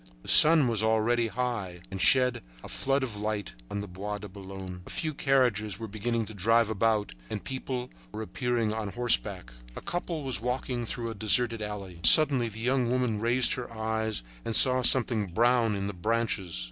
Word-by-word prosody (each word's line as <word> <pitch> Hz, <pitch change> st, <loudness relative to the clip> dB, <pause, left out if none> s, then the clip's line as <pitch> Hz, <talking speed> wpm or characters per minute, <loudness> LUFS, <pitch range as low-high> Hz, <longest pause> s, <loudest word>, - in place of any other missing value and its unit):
The -, -, -9 dB
sun 155 Hz, -3 st, +9 dB
was 115 Hz, -3 st, 0 dB
already 110 Hz, +2 st, 0 dB
high 110 Hz, -8 st, -5 dB
and 95 Hz, 0 st, -5 dB
shed 125 Hz, -2 st, +3 dB, 0.2 s
a -, -, -9 dB
flood 135 Hz, 0 st, -2 dB
of 115 Hz, -5 st, -6 dB
light 105 Hz, -1 st, -5 dB, 0.2 s
on 100 Hz, -, -5 dB
the 100 Hz, -, -8 dB
Bois 100 Hz, +3 st, -7 dB
de 105 Hz, +1 st, -10 dB
Boulogne. 95 Hz, -2 st, -10 dB
A -, -, -11 dB
few 155 Hz, -1 st, -3 dB
carriages 125 Hz, -8 st, 0 dB
were 115 Hz, -, -8 dB
beginning 110 Hz, +2 st, -3 dB
to 110 Hz, -, -11 dB
drive 115 Hz, +3 st, +1 dB
about 110 Hz, -, -1 dB, 0.2 s
and -, -, -6 dB
people 130 Hz, -1 st, -6 dB, 0.2 s
were 110 Hz, -, -7 dB
appearing 120 Hz, -1 st, -3 dB
on 110 Hz, -1 st, -5 dB
horseback. 100 Hz, -, -2 dB, 0.2 s
A -, -, -8 dB
couple 175 Hz, -2 st, -5 dB
was 130 Hz, -7 st, -3 dB
walking 125 Hz, -1 st, -4 dB
through 115 Hz, 0 st, -5 dB
a -, -, -6 dB
deserted 115 Hz, +2 st, 0 dB
alley. 100 Hz, -4 st, -8 dB
Suddenly 130 Hz, -, +7 dB
the 110 Hz, +1 st, -11 dB
young 125 Hz, +1 st, -1 dB
woman 125 Hz, -4 st, -1 dB
raised 120 Hz, +3 st, +2 dB
her 125 Hz, -2 st, -7 dB
eyes 110 Hz, -, -3 dB, 0.2 s
and 115 Hz, -, -4 dB
saw 130 Hz, -1 st, +6 dB
something 120 Hz, -4 st, +3 dB
brown 115 Hz, +3 st, +1 dB
in 100 Hz, 0 st, -4 dB
the 100 Hz, -, -5 dB
branches. 100 Hz, -, -3 dB
115 Hz, 185 wpm, -27 LUFS, 105-125 Hz, 0.2 s, sun